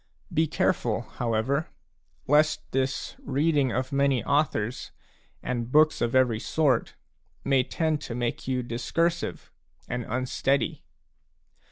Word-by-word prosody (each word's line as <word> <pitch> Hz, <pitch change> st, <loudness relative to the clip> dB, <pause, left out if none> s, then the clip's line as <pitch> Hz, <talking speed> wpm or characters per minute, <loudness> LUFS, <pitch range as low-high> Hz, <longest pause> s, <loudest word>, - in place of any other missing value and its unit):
Be 160 Hz, +1 st, +3 dB
careful, 120 Hz, -7 st, 0 dB
however, 120 Hz, +6 st, -1 dB, 0.6 s
lest 150 Hz, +2 st, +3 dB
this 135 Hz, +1 st, -1 dB
reading 140 Hz, -1 st, +1 dB
of 130 Hz, +3 st, -2 dB
many 140 Hz, -4 st, +2 dB
authors 140 Hz, -5 st, 0 dB, 0.5 s
and 120 Hz, -1 st, -3 dB
books 155 Hz, +2 st, +4 dB
of 120 Hz, +1 st, 0 dB
every 125 Hz, -4 st, +3 dB
sort 140 Hz, -2 st, +1 dB, 0.5 s
may 135 Hz, -1 st, +3 dB
tend 155 Hz, +3 st, -1 dB
to 115 Hz, -, -6 dB
make 120 Hz, 0 st, -3 dB
you 130 Hz, -1 st, 0 dB
discursive 165 Hz, +9 st, -2 dB, 0.4 s
and 125 Hz, 0 st, -3 dB
unsteady. 130 Hz, +2 st, 0 dB
130 Hz, 115 wpm, -27 LUFS, 120-150 Hz, 0.6 s, books